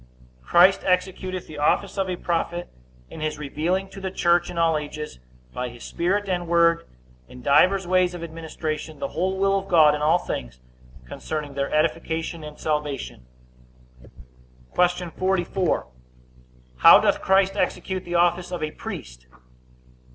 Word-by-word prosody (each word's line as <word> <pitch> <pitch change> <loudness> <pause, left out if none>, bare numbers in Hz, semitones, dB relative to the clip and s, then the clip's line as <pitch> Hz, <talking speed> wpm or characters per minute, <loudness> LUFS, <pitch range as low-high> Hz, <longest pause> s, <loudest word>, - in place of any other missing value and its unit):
Christ 180 - +5
executeth 185 0 -1
the 150 -1 -9
office 185 +6 +1
of 195 -2 -1
a 180 - -1
prophet, 175 0 -2 0.4
in 160 - -9
his 155 0 -2
revealing 165 +6 -2
to 195 - -10
the 190 - -3
church, 175 -2 +2
in 175 - -7
all 165 -1 +3
ages, 150 - -5 0.3
by 125 0 -3
his 120 0 -12
Spirit 195 +4 -1
and 175 -2 -2
word, 170 0 +3 0.4
in 125 0 -13
divers 180 +7 +4
ways 180 0 +2
of 170 - -7
administration, 160 -1 -5
the - - -4
whole 190 +2 -1
will 195 0 +2
of 195 - -10
God, 155 -4 +6
in 150 - -3
all 155 +3 +4
things 60 - -6 0.5
concerning 150 - -5
their 140 0 -2
edification 160 +1 -1
and 150 0 -9
salvation. 150 - -3 1.5
Q. 180 -1 +1
44. 185 -1 0 0.9
How 60 - +9
doth - - +1
Christ 195 0 +3
execute 185 -1 -2
the 175 0 -5
office 175 +1 +2
of 175 -3 -4
a 155 - -2
priest? 60 - -9
170 Hz, 150 wpm, -24 LUFS, 150-185 Hz, 1.5 s, How